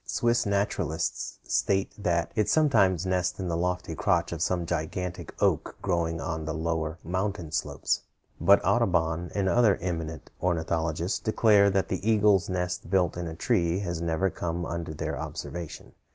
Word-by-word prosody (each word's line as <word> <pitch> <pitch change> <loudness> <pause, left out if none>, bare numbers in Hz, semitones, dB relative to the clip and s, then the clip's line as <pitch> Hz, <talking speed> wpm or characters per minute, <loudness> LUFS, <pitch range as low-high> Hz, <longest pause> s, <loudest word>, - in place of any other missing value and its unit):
Swiss 120 -2 +1
naturalists 100 -5 -1
state 100 0 0
that 85 -5 0
it 105 - +1
sometimes 100 - +3
nests 90 +1 0
in 95 -2 -2
the 85 - 0
lofty 90 0 -1
crotch 85 0 +1
of 85 -2 -4
some 90 0 0
gigantic 85 +2 -3
oak - - +1
growing 85 -1 0
on 80 -2 -3
the 80 -1 -3
lower 80 0 -2
mountain 95 -1 -2
slopes, - - -1 0.4
but - - +6
Audubon 85 -1 +1
and 100 -2 +1
other 110 -2 +4
eminent 80 -3 -4
ornithologists 85 0 0
declare 105 -2 +4
that 95 -1 0
an 95 - 0
eagle's 105 -3 +3
nest 90 -2 -2
built 90 -2 +2
in 85 -1 -4
a 80 - -6
tree 85 -3 +1
has 85 -4 -3
never 85 +3 0
come 85 0 -3
under 85 -1 -4
their 75 - -3
observation. 85 -3 -6
90 Hz, 155 wpm, -27 LUFS, 85-95 Hz, 0.4 s, but